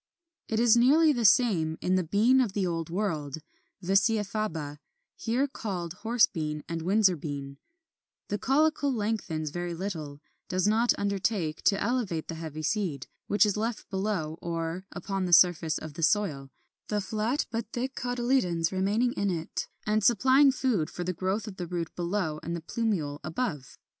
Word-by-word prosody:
26. 220 - -1
It - - +3
is 240 -1 +6
nearly 300 +6 +5
the 240 -3 -1
same 190 -8 +4
in 185 - 0
the 185 -1 +2
Bean 220 +10 +4
of 225 -7 -1
the 195 -2 0
Old 165 -2 -2
World 160 -7 -2 0.5
(Vicia 205 +4 +3
Faba, 165 -8 -4 0.4
here 255 -5 0
called 180 - -5
Horse 230 +1 +4
Bean 150 -3 -4
and 165 0 -3
Windsor 190 +1 +3
Bean): 140 -2 -6 0.7
the 205 - -2
caulicle 290 +1 +2
lengthens 205 - -2
very 175 +1 -4
little, 160 -6 -5 0.3
does 185 +1 +1
not 225 +3 +3
undertake 200 -5 -1
to 200 - +4
elevate 210 -9 -1
the - - -3
heavy 160 -1 -6
seed, 170 - -1 0.2
which 205 +1 +4
is 205 - 0
left 220 +1 -3
below 190 -5 -2
or 170 +2 -4
upon 195 -2 -3
the 175 - -1
surface 170 -3 +5
of 155 -2 -8
the 165 - -7
soil, 155 -7 +1 0.4
the 210 - 0
flat 215 +7 -1
but 230 -2 -3
thick 255 +2 -3
cotyledons 240 -10 0
remaining 205 +6 +1
in 200 0 -1
it, 165 -3 -3 0.2
and 215 0 +1
supplying 260 +6 +5
food 245 - 0
for 180 - -5
the 180 +1 -2
growth 190 +5 -2
of 195 -2 -8
the 175 - -4
root 170 -2 -4
below 175 -3 -2
and 170 +1 -4
the 170 - -5
plumule 160 -4 -2
above. 155 - -4
195 Hz, 170 wpm, -28 LUFS, 165-225 Hz, 0.7 s, is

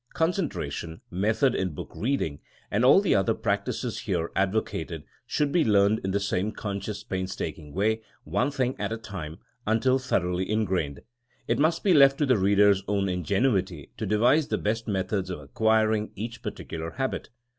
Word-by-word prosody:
Concentration, 140 - -2
method 110 +8 +2
in 90 -8 -2
book - - -7
reading, 110 - -1 0.3
and 105 +4 +1
all 135 +9 +7
the 200 - +2
other 95 -2 +2
practices - - -2
here 80 - -2
advocated 95 -5 -1 0.2
should 145 -1 0
be 170 0 +3
learned 105 0 +4
in 95 - -1
the 100 +1 +1
same 100 +1 -1
con 100 -3 -4
scious, 105 +2 -6
painstaking 95 -6 -4
way, 110 +6 +1 0.2
one 100 - 0
thing 130 -3 -1
at - - -2
a 115 - -2
time, 90 -8 -7 0.3
until 130 +4 +3
thoroughly 90 -7 -1
ingrained. 95 -10 -1 0.5
It 115 +2 +1
must 160 +3 +2
be 195 - +4
left 140 -2 +6
to 150 - +2
the 130 -6 +3
reader 100 +1 +5
*s 100 -1 +1
own 100 -1 +1
ingenuity 95 - 0
to - - -3
devise 120 +9 +3
the - - 0
best 115 +2 -2
methods 95 -1 -1
of 90 - -4
acquiring 110 +7 +1
each 115 +3 -6
particular 80 0 -6
habit. 135 -1 -2
105 Hz, 170 wpm, -27 LUFS, 95-120 Hz, 0.5 s, all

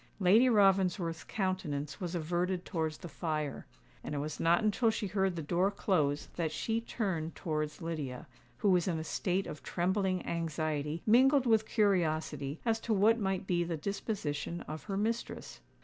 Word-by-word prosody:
Lady 210 +7 +6
Ravensworth's 190 -5 +3
countenance 160 -8 -3
was 180 -1 -3
averted 175 +2 -1
towards 160 -4 -2
the 175 - -8
fire; 155 -2 -3 0.4
and - - -4
it - - -2
was 150 +2 -4
not 170 +5 +3
until 215 +2 +3
she 220 - -2
heard 190 -1 0
the 165 - -4
door 175 +5 +2
close 155 -8 0
that 165 -3 0
she 225 +7 -1
turned 185 -9 -3
towards 155 -1 -3
Lydia, 150 -7 -4 0.3
who 200 - +3
was 180 -1 +3
in 170 -3 0
a 160 - -3
state 185 +4 -1
of 150 - -7
trembling 185 0 0
anxiety, 155 -1 -2
mingled 260 +4 +5
with 220 -2 +3
curiosity, 155 - +1
as 225 -1 +2
to 225 -1 0
what 220 +4 +4
might 190 -2 -1
be 175 -2 +1
the 170 -1 -3
disposition 175 -3 -3
of 155 +1 -7
her 195 -2 -3
mistress. 225 +3 -3
180 Hz, 165 wpm, -32 LUFS, 155-200 Hz, 0.4 s, Lady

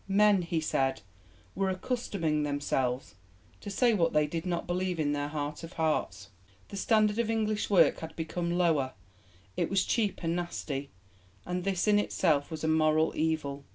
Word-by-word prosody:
Men, 200 0 +4
he 170 -1 -1
said, 135 -6 0 0.5
were 195 -1 0
accustoming 185 -6 -1
themselves 140 -4 -1 0.5
to - - -7
say 235 +4 +3
what 170 -5 +2
they 150 0 +4
did 165 +4 -4
not 175 -1 -1
believe 180 -1 -1
in 145 -2 +1
their 145 0 -1
heart 145 0 -4
of 165 - -8
hearts. 100 - -1 0.4
The - - -7
standard 215 +1 +2
of 235 -1 +1
English 215 -2 0
work 200 - +5
had 160 0 -8
become 170 +1 -3
lower; 155 -7 +2 0.6
it - - 0
was 195 -1 +2
'cheap 210 -4 0
and 165 0 0
nasty,' 145 -5 -4 0.6
and 180 0 -3
this 195 -1 0
in 205 0 +5
itself 155 -8 +1
was 160 -1 -6
a - - +1
moral 155 0 +3
evil. 155 -3 -1
165 Hz, 170 wpm, -30 LUFS, 150-195 Hz, 0.6 s, work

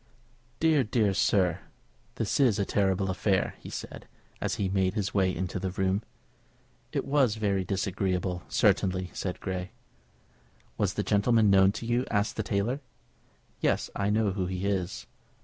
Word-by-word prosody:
"Dear, 160 -4 +4
dear, 105 -3 +1
sir 95 -2 +2 0.6
this 110 +3 -1
is 125 -7 +4
a 100 - 0
terrible 95 -1 +1
affair!" 95 0 +1
he - - -10
said, - - -7 0.3
as - - -1
he 100 - -1
made 95 0 +1
his 100 -3 -1
way 95 -2 +3
into 90 +2 -3
the 95 +1 -2
room. 95 +2 0 0.9
"It - - -2
was 135 -6 +2
very 100 -3 0
disagreeable, 95 -1 -1
certainly," 95 -3 +2
said 90 -2 -4
Grey. 90 -1 -4 1.1
"Was - - 0
the - - 0
gentleman 105 0 +3
known 95 0 +6
to 115 - -6
you?" 120 +2 0
asked 100 -1 0
the - - -1
tailor. 110 +7 -1 0.8
"Yes; - - 0
I 100 0 0
know 105 -1 +2
who 95 -1 -2
he 90 +1 -3
is." 95 -3 -2
100 Hz, 155 wpm, -28 LUFS, 95-105 Hz, 1.1 s, known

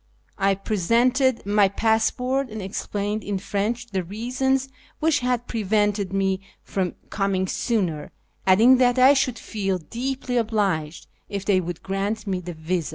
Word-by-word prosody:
I 195 0 +3
presented 235 +6 +1
my 205 -1 +4
passport, 250 +5 +1
and 220 0 -6
explained 205 +2 -3
in 200 -1 -2
French 210 +5 -2
the 195 -5 -3
reasons 255 +7 -1 0.3
which 310 -2 +2
had 250 -1 -1
pre 230 -2 -3
vented 205 -1 +1
me 195 -1 0 0.2
from 185 -3 -2 0.2
coming 195 -2 0
sooner, 180 -10 -1 0.4
adding 225 +8 +7
that 250 0 +3
I 260 +2 +7
should 260 -3 +1
feel 195 -3 -2
deeply 245 - -3
obliged 195 -9 -1 0.2
if 200 -1 -4
they 190 -3 +3
would 175 -1 -6
grant 200 +3 -2
me 190 -3 -1
the 175 -1 -7
visa. 160 +1 -2
205 Hz, 150 wpm, -24 LUFS, 190-245 Hz, 0.4 s, adding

